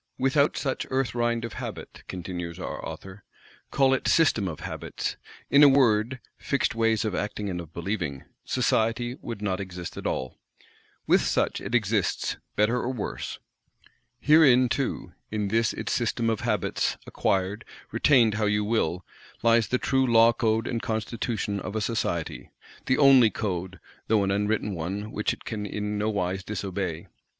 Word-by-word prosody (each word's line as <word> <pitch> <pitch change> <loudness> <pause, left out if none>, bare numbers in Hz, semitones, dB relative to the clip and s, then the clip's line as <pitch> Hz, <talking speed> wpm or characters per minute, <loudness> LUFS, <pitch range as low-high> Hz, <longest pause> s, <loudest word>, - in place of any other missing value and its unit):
"Without 140 +3 +2
such 135 -2 -2
Earth 130 -1 0
rind 120 -1 0
of 115 - -7
Habit," - - -7
continues 90 -2 -5
our - - -6
author, 95 0 -8 0.5
"call 135 -1 +3
it 135 - -1
System 115 -11 +3
of 80 -4 -6
Habits, - - -4 0.4
in 140 - +7
a 145 - +9
word, 125 -2 +3 0.2
fixed 140 -3 0
ways 115 -1 +1
of 105 - -1
acting 105 +1 -3
and 90 -1 -3
of 80 -2 -12
believing,—Society 110 - -2
would 115 -3 -6
not 95 -2 -1
exist 90 -3 -7
at - - -3
all. 65 -1 -3 0.7
With - - +4
such - - 0
it 110 +5 -3
exists, 105 -4 0 0.2
better 105 +4 +2
or 125 +1 -1
worse. 120 -5 -5 0.8
Herein 135 -5 +6
too, 125 - -2 0.2
in 105 -2 -2
this 115 +2 +2
its - - -3
System 115 -1 0
of 110 - -1
Habits, 105 -5 -1
acquired, 95 +4 -1 0.3
retained 120 -7 +4
how 105 0 0
you 105 0 +1
will, 90 -5 0 0.4
lies 115 -2 +4
the 125 - +1
true 130 0 +1
Law 115 0 +6
Code 110 -1 +1
and 115 -2 -2
Constitution 110 -2 -2
of 100 +2 -6
a - - +1
Society; 85 - -2 0.4
the 130 - +3
only 135 -5 +7
Code, 95 -4 -4 0.3
though 105 -2 +3
an 95 - 0
unwritten 105 +1 0
one 95 +6 -4
which 105 - 0
it - - -8
can 105 -2 -4
in 105 0 -3
nowise 95 -3 -1
_dis_obey. 95 -5 -4
110 Hz, 160 wpm, -26 LUFS, 95-120 Hz, 0.8 s, a